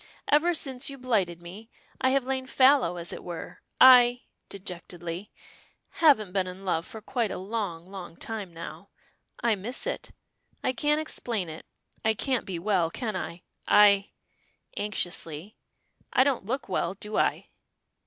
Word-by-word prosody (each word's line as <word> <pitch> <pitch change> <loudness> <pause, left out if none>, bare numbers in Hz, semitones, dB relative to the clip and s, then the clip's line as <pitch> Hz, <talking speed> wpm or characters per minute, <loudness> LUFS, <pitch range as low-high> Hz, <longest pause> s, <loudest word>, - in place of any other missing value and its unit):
Ever 330 +4 +4
since 265 -4 -1
you 275 - -8
blighted 195 -10 0
me, 200 +6 -10 0.3
I 260 - +4
have 270 0 +2
lain 260 0 -2
fallow, 260 -10 +4
as 170 0 -4
it - - -8
were. 175 -2 -7 0.2
I," 245 -1 +8 0.3
dejectedly, 180 -1 -6 0.7
"haven't 260 - +5
been 190 -2 +1
in 185 +2 -8
love 165 -2 0
for 220 - -8
quite 235 -2 -1
a - - -4
long, 190 -4 -4
long 185 -3 -9
time 215 -5 -5
now. 170 0 -9 0.5
I 235 -1 +4
miss 215 - -2
it - - -3 0.5
I 255 - +1
can't 295 +4 +1
explain 230 - -3
it. 155 +1 -9 0.4
I 220 0 +3
can't 255 +2 -1
be 185 -3 -3
well, 180 -2 +1
can 215 +3 -4
I? 175 -1 -5 0.2
I," 200 -1 +6 0.6
anxiously, 180 -3 -3 0.6
"I 260 - +5
don't 270 -7 0
look 260 +4 -2
well, 185 -1 -1
do 210 +2 -5
I?" - - +1
210 Hz, 155 wpm, -28 LUFS, 180-255 Hz, 0.7 s, I